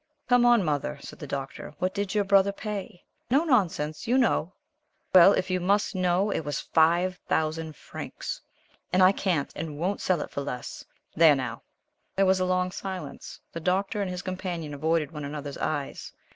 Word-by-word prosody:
"Come 245 -1 +5
on, 235 -6 +5
Mother," 150 -1 -1
said - - -10
the 145 - -7
Doctor, 135 +1 -6
"what 185 +3 -1
did 200 0 -2
your 205 - +3
brother 200 0 +4
pay? 200 -2 -6 0.3
No 275 +6 +4
nonsense, 185 - 0
you 250 +3 +3
know." 225 -9 +2 0.6
"Well, 185 +2 +9
if 185 0 -1
you 185 - +1
must 200 +4 +1
know 185 +2 +1
it - - 0
was 145 -2 -3
FIVE 175 +3 +2
THOUSAND 160 0 -1
FRANCS, - - -7 0.5
and 185 +1 +4
I 185 - +8
can't 180 -7 -1
and 155 -2 -5
won't 185 +6 -1
sell 180 -4 +1
it - - -6
for 140 - -3
less. 125 -3 -6 0.3
There, 160 -2 +7
now!" 125 -4 -4 0.5
There 195 - +3
was 190 0 +3
a 185 - +1
long 185 0 +1
silence. 190 -1 -7
The 165 - -4
Doctor 190 +5 0
and 195 - -1
his 180 -1 -5
companion 180 -5 -4
avoided 155 +1 0
one 150 -2 -6
another's 145 0 -6
eyes. 145 -3 -3
180 Hz, 185 wpm, -27 LUFS, 155-195 Hz, 0.6 s, Well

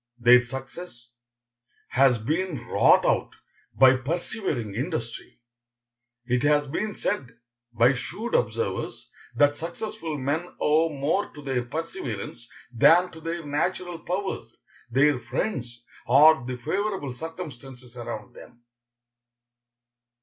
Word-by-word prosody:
Their 125 +1 +7
success 130 0 -9 0.8
has 130 -1 +4
been 150 - -2
wrought - - +4
out - - +1 0.4
by 130 0 +7
persevering 140 - -3
industry. 120 - -5 0.9
It 125 0 +1
has 145 0 +3
been 205 +9 -3
said 115 -3 -3 0.3
by 120 +3 +4
shrewd 220 - -5
observers 110 -4 -1 0.2
that 145 0 +4
successful 165 0 -5
men 145 +6 -2
owe 160 +2 +3
more 150 +7 -1
to 150 - -10
their 130 -3 -1
perseverance 120 -6 -5 0.2
than 175 +10 +5
to 160 - -12
their 165 0 -4
natural 170 +4 -2
powers, 190 +4 -4 0.3
their 135 +2 +3
friends, 120 - -4 0.2
or 140 +1 +6
the 125 -1 -4
favorable 190 - -2
circumstances 135 -5 -9
around 120 -1 -7
them. 120 -1 -15
135 Hz, 110 wpm, -26 LUFS, 120-165 Hz, 0.9 s, Their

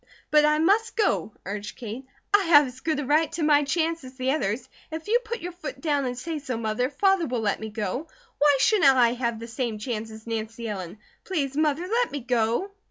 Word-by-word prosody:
"But 300 0 +6
I 300 0 +3
must 415 +9 +2
go!" 420 - +1
urged 205 +2 -5
Kate. 240 +3 -7 0.3
"I 405 -1 +5
have 300 -3 +7
as 255 0 -9
good 310 +1 -1
a 295 - -3
right 305 +3 +2
to 335 -1 -2
my 295 -1 +5
chance 325 +2 0
as 260 0 -11
the 260 0 0
others. 245 -3 -1 0.2
If 320 +2 -6
you 470 +3 +4
put 470 +1 -5
your 355 - -5
foot 360 +8 -7
down 290 -4 0
and 250 -1 -3
say 320 +4 -4
so, 255 -4 -4
Mother, 230 +3 -1
Father 385 +1 +2
will 245 -2 -2
let 205 -2 0
me 220 - -5
go. 215 - -3 0.3
Why 290 -1 +5
shouldn't 375 +1 +5
I 240 -2 +4
have 235 -2 -2
the 230 - -7
same 235 -2 -3
chance 220 0 -4
as 220 0 -11
Nancy 225 0 -4
Ellen? 190 -2 -5 0.3
Please 280 -8 -2
Mother, 310 +3 +1
let 470 +4 +1
me 285 - -4
go!" 240 - 0
275 Hz, 225 wpm, -26 LUFS, 230-325 Hz, 0.3 s, have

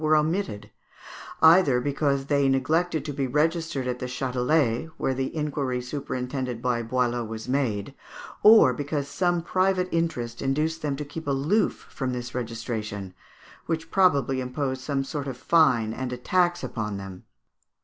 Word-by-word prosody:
were 155 0 +3
omitted, 155 - -1 0.7
either 160 -6 +6
because 140 +1 0
they 140 -1 +2
neglected 155 +4 +1
to 145 - -4
be 135 -1 -1
registered 155 0 0
at 125 0 -2
the 125 - -4
Châtelet, 125 +2 0
where 135 - 0
the 130 +3 -3
inquiry 145 -4 -1
superintended 125 -1 -4
by 120 -1 0
Boileau 120 0 0
was 110 +1 -7
made, 125 -4 -1 0.5
or 215 - +8
because 145 +1 -3
some 175 +2 0
private 185 +1 +1
interest 125 -9 -2
induced 155 +4 0
them 145 -2 -1
to 150 +2 -5
keep 160 +2 -8
aloof 145 +10 +1
from 130 -3 -3
this 120 0 -5
registration, 110 -5 -4 0.5
which 165 0 -3
probably 140 -8 +3
imposed 130 +1 -3
some 135 0 -1
sort 140 +1 -5
of 130 -3 -5
fine 125 -9 +3
and 130 +1 -4
a 125 - -3
tax 175 +6 +1
upon 105 -3 -3
them. 95 -2 -9
135 Hz, 150 wpm, -26 LUFS, 125-155 Hz, 0.7 s, or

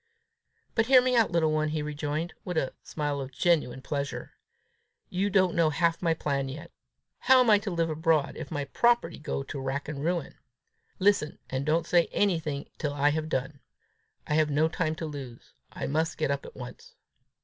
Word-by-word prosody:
"But 225 -1 +2
hear 260 -1 +8
me 250 0 +2
out, 230 -5 +4
little 165 -2 +2
one," 155 0 +1
he 155 -1 -2
rejoined, 150 +3 -3
with 180 -3 -4
a 135 -4 0
smile 145 -2 -3
of 135 0 -6
genuine 135 -4 +1
pleasure; 140 -1 -4 0.8
"you 195 +3 0
don't 185 -2 +3
know 165 -2 +3
half 165 +2 +1
my 165 -2 +2
plan 140 -3 -1
yet. 155 +5 -8 0.5
How 260 0 +6
am 245 -3 +5
I 205 - +6
to 205 - -4
live 165 -2 0
abroad, 155 -2 +1
if - - -7
my 145 -3 -3
property 235 - +2
go 140 -2 -3
to 140 +1 -6
rack 135 +2 -3
and 145 -2 -5
ruin? 175 +1 -1 0.6
Listen, 195 -6 +2
and 135 +2 -2
don't 160 +2 +2
say 170 0 +3
anything 160 -8 0
till 145 -3 -2
I 145 +1 +3
have 155 +1 -2
done; 135 +1 -2 0.7
I - - -2
have 155 0 +3
no 150 +2 +3
time 160 -1 -1
to 160 - -5
lose; 135 -6 -8 0.2
I - - -5
must 160 +3 -1
get 155 -3 0
up 140 0 -3
at - - -13
once. 125 -1 -10
155 Hz, 195 wpm, -28 LUFS, 145-170 Hz, 0.8 s, hear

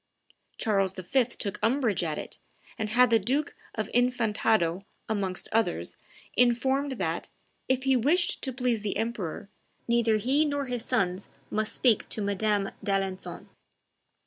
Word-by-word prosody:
Charles 195 -4 +1
V. 190 +8 +1
took 210 -4 -6
umbrage 225 -3 +2
at 155 -3 -2
it, - - -7 0.4
and 215 -1 -3
had 245 +2 +5
the 225 - +6
Duke 270 +9 -1 0.2
of 215 -2 -2
Infantado, 220 -7 +2 0.2
amongst 195 -4 -2
others, 225 +1 0 0.4
informed 265 +3 +2
that, 170 -8 -2 0.4
if 260 0 +2
he 265 -1 +3
wished 320 +9 +2
to 265 - -1
please 250 -3 0
the 205 -1 -2
emperor, 220 -6 -3 0.4
neither 235 -2 +3
he 265 +8 +2
nor 285 -2 -1
his 245 -3 -3
sons 190 -6 0 0.2
must 215 0 -1
speak 235 -5 +2
to - - -3
Madame 205 0 0
d'Alencon. 195 -1 -2
225 Hz, 140 wpm, -28 LUFS, 200-250 Hz, 0.4 s, the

